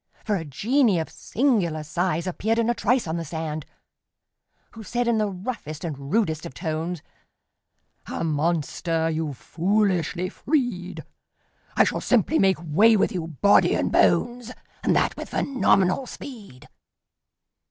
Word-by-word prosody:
For 210 - +1
a 175 - -2
genie 215 - +2
of 160 - -3
singular 200 - 0
size 170 +2 -1
Appeared 215 +5 -1
in 230 0 +2
a - - +1
trice 240 +2 +1
on 160 0 -2
the 165 - -3
sand, 155 -1 -5 1.0
Who 225 - -11
said 240 +4 -2
in 230 -2 +2
the 210 -1 +1
roughest 185 - -6
and 140 -4 -6
rudest 160 -8 +1
of 130 - -8
tones: 165 0 -3 1.0
"A - - -4
monster 165 +1 0
you've 155 -4 -3
foolishly 185 - 0
freed! 245 - -2 0.7
I - - +6
shall - - -1
simply 250 - +2
make 190 -1 +4
way 210 +8 +5
with - - +2
you, 170 -3 -3
body 200 +6 +4
and - - 0
bones, 245 0 +2 0.3
And - - +2
that - - +1
with - - -7
phenomenal 230 -2 +2
speed!" 210 - -10
185 Hz, 140 wpm, -24 LUFS, 160-225 Hz, 1.0 s, I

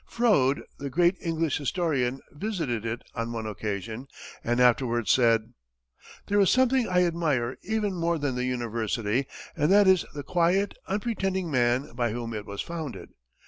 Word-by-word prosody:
Froude, 145 - +2 0.2
the 140 - -4
great 175 +6 +3
English 165 -3 -1
historian, 140 -4 0
visited 145 - -3
it 115 +2 -4
on 115 -1 -3
one 115 -1 -4
occasion, 110 +3 -4 0.4
and 120 +1 0
afterwards 120 -2 +3
said: 115 -3 +3 0.7
"There 205 0 +1
is 195 -3 +5
something 255 -1 +3
I 180 0 +3
admire 150 -8 0
even 210 -1 -1
more 170 -1 0
than 145 -3 -1
the 125 0 -2
university, 120 0 -1 0.3
and 150 +2 +2
that 205 +1 +6
is 190 -2 +5
the 145 - -5
quiet, 180 +5 +1
unpretending 195 -4 -1
man 125 +1 +1
by 120 -2 -1
whom 115 -1 -4
it 105 -1 -6
was 100 0 -4
founded. 150 - -6
140 Hz, 155 wpm, -27 LUFS, 120-180 Hz, 0.7 s, that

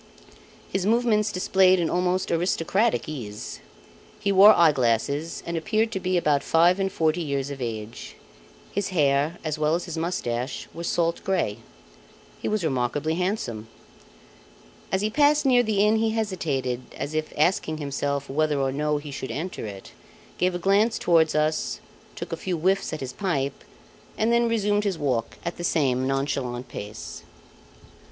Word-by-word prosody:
His 195 - 0
movements 220 -2 +2
displayed 185 0 +4
an 170 - +1
almost 180 +2 0
aristocratic 180 +6 +1
ease. 110 -9 -6 0.6
He 200 - 0
wore 200 +2 +9
eye 170 -2 +6
glasses 140 +5 0
and 170 - -3
appeared 215 +6 0
to 190 - -2
be 185 0 0
about 150 -4 +2
five 175 +3 +3
and 195 0 0
forty 160 +1 +1
years 140 -3 -2
of 135 -2 -7
age. 110 -2 -6 0.6
His 200 0 -1
hair 150 -2 +1
as 155 -1 -3
well 155 +1 +2
as 175 - -3
his 170 -2 -5
moustache 130 -7 -3
were 170 - -6
salt 170 0 0
grey. 185 - 0 0.8
He - - -2
was 215 -3 0
remarkably 140 +2 0
handsome. 165 - -2 1.2
As 190 - +1
he 215 +1 0
passed 295 +3 +3
near 250 -2 +5
the 210 -3 +2
inn, 215 +1 +4
he 225 0 +1
hesitated, 160 - -2 0.2
as 145 - -4
if 155 0 -2
asking 155 0 +1
himself 140 -1 -2
whether 150 +1 0
or 135 -1 +1
no 150 +2 0
he 145 0 -7
should 135 -1 -5
enter 150 +1 -4
it; 100 -2 -9 0.5
gave 180 0 +1
a - - 0
glance 200 +5 +2
towards 165 -3 +3
us, 155 +1 0 0.4
took - - -7
a - - -1
few 180 0 -2
whiffs 190 +4 +1
at 155 - -5
his 130 -1 -5
pipe, 140 -6 -2 0.5
and 225 +2 +2
then 235 0 +3
resumed 210 -2 +1
his 195 -4 -1
walk 130 -6 -1
at 170 - -3
the 175 - -6
same 130 -6 +1
nonchalant 135 -2 -2
pace. 105 +1 -7
165 Hz, 165 wpm, -25 LUFS, 140-195 Hz, 1.2 s, wore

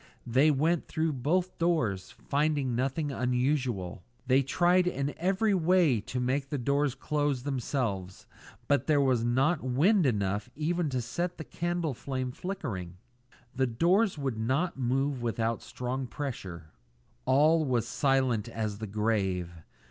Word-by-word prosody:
They 130 +6 +4
went 155 +4 +1
through 160 0 -1
both 170 +8 -1
rooms, 120 - +1
finding 145 -3 -1
nothing 135 +5 -1
unusual. 125 -8 -1 0.2
They 130 +1 +4
tried 175 +6 +3
in 140 -4 -1
every 195 +5 +1
way 175 - +3
to 125 +4 -4
make 135 +3 -1
the 145 - -2
doors 140 +1 +1
close 145 0 0
of 125 - -11
themselves, 120 -9 -3 0.4
but 140 -4 +2
there 150 -2 +4
was 130 -4 +2
not 135 +7 +2
wind 155 - +3
enough 105 -3 -1
even 160 +2 0
to 130 -2 -1
set 175 +9 -3
the 160 - -6
candle 170 -2 -2
flame 130 0 -4
flickering. 105 - -5 0.6
The 130 0 +2
doors 175 - +2
would 135 -6 -3
not 135 +10 0
move 135 +1 0
without 115 -1 -1
strong 125 +1 -4
pressure. 95 - -6 0.5
All 150 +5 +4
was 125 -5 0
silent 130 -5 +1
as 110 -3 -3
the 110 - -4
grave. 100 -4 0
135 Hz, 140 wpm, -29 LUFS, 120-155 Hz, 0.6 s, They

